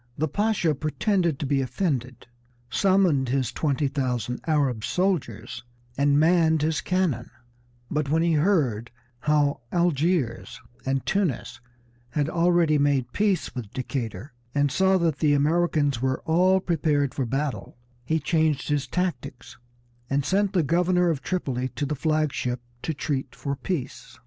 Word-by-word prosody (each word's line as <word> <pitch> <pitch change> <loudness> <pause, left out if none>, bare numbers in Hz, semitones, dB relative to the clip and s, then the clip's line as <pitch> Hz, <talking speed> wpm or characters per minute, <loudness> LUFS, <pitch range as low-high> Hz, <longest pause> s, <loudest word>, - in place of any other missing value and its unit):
The 155 - 0
Pasha 205 -2 +1
pretended 165 +3 0
to 145 - -3
be 140 0 +1
offended, 130 -3 -2 0.5
summoned 185 -9 +3
his 130 -3 0
twenty 145 -1 0
thousand 125 -3 -2
Arab 140 -8 +1
soldiers 120 - -2 0.3
and 140 +1 +3
manned 160 -1 +3
his 155 0 0
cannon; 180 -11 -1 0.6
but 150 -2 -1
when 160 +2 +2
he 170 -1 +2
heard 145 - +1 0.3
how 145 0 +1
Algiers 165 -7 0 0.3
and 135 0 0
Tunis 140 - -1 0.5
had 145 +4 -1
already 170 -3 +3
made 140 -4 +1
peace 205 -3 0
with 115 -6 -6
Decatur, 125 -1 -4 0.2
and 145 -1 +2
saw 190 +5 +3
that 165 -5 0
the 150 -2 +3
Americans 150 -3 +1
were 130 0 0
all 185 +4 +3
prepared 150 -6 0
for 135 -4 -2
battle, 135 0 -3 0.3
he 160 +6 0
changed 155 -2 0
his 145 -1 0
tactics 140 -8 -4 0.5
and 140 0 0
sent 200 +1 +1
the 180 -4 +3
governor 175 +3 +2
of 145 -4 -3
Tripoli 130 -9 -2
to 145 - -1
the 145 - -2
flag 155 0 0
ship 125 0 -2 0.2
to 160 - -3
treat 135 -2 -3
for 140 -1 -3
peace. 140 -5 -5
150 Hz, 145 wpm, -25 LUFS, 130-170 Hz, 0.6 s, summoned